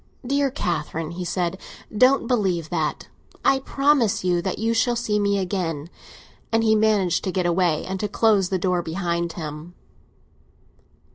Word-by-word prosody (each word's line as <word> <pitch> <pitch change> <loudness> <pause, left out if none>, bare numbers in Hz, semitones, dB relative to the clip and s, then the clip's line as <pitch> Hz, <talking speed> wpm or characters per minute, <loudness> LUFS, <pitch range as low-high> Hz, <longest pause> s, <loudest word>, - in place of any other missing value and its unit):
"Dear 280 +2 +1
Catherine," 160 - -3
he 180 +1 -5
said, 180 +1 -2 0.4
"don't 255 +4 +4
believe 190 -9 0
that - - -2 0.4
I 270 -1 +4
promise 275 -6 +2
you 175 -1 +1
that 185 +1 -3
you 225 +1 0
shall 240 +1 +2
see 215 -3 0
me 200 0 +1
again!" 175 -5 -3 0.6
And 225 0 +2
he 220 -1 +4
managed 210 -5 +2
to 190 - -1
get 185 -1 -1
away 175 -2 +1
and 190 0 -4
to 210 - -1
close 205 -3 +2
the 190 - 0
door 180 -1 0
behind 170 0 -2
him. 155 +2 -7
190 Hz, 155 wpm, -23 LUFS, 170-225 Hz, 0.6 s, don't